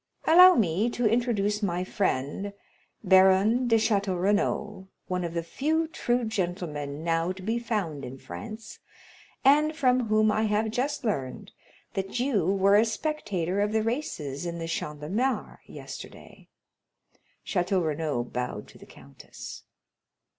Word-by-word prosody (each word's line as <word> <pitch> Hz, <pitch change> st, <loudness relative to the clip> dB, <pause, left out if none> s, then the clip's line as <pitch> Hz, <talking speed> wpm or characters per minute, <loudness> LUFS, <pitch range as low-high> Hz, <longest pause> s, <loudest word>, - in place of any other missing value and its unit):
Allow 360 Hz, +3 st, +8 dB
me 205 Hz, +2 st, +1 dB
to 240 Hz, 0 st, -2 dB
introduce 215 Hz, -2 st, +1 dB
my 180 Hz, -3 st, -1 dB
friend, 190 Hz, +1 st, -2 dB, 0.5 s
Baron 190 Hz, +5 st, +5 dB
de 230 Hz, -, +4 dB
Château 200 Hz, -4 st, +1 dB
Renaud, 205 Hz, 0 st, 0 dB, 0.2 s
one 180 Hz, -1 st, -2 dB
of 170 Hz, -1 st, -4 dB
the 170 Hz, -, -1 dB
few 315 Hz, -, -1 dB
true 245 Hz, -6 st, -1 dB
gentlemen 175 Hz, -8 st, -3 dB
now 165 Hz, +1 st, 0 dB
to 185 Hz, 0 st, -8 dB
be 225 Hz, +4 st, -1 dB
found 200 Hz, -, -3 dB
in 130 Hz, +1 st, -7 dB
France, 215 Hz, -, -9 dB, 0.7 s
and 300 Hz, +3 st, +5 dB
from 255 Hz, -5 st, +2 dB
whom 215 Hz, 0 st, +3 dB
I 220 Hz, +1 st, +1 dB
have 215 Hz, +1 st, 0 dB
just 265 Hz, +4 st, -2 dB
learned 135 Hz, -, -3 dB, 0.4 s
that 195 Hz, +5 st, -3 dB
you 240 Hz, -, +1 dB
were 195 Hz, +1 st, +4 dB
a 215 Hz, -, +5 dB
spectator 210 Hz, -, -2 dB
of 210 Hz, +1 st, 0 dB
the 220 Hz, -1 st, +2 dB
races 175 Hz, -, -3 dB
in 170 Hz, 0 st, -4 dB
the 165 Hz, 0 st, -5 dB
Champ 150 Hz, -2 st, -4 dB
de 150 Hz, -, -6 dB
Mars, 250 Hz, +7 st, -1 dB
yesterday." -, -, -11 dB, 1.0 s
Château 180 Hz, -1 st, 0 dB
Renaud 150 Hz, -5 st, -1 dB
bowed 125 Hz, 0 st, -4 dB
to -, -, -16 dB
the -, -, -14 dB
countess. -, -, -12 dB
200 Hz, 145 wpm, -27 LUFS, 170-230 Hz, 1.0 s, Allow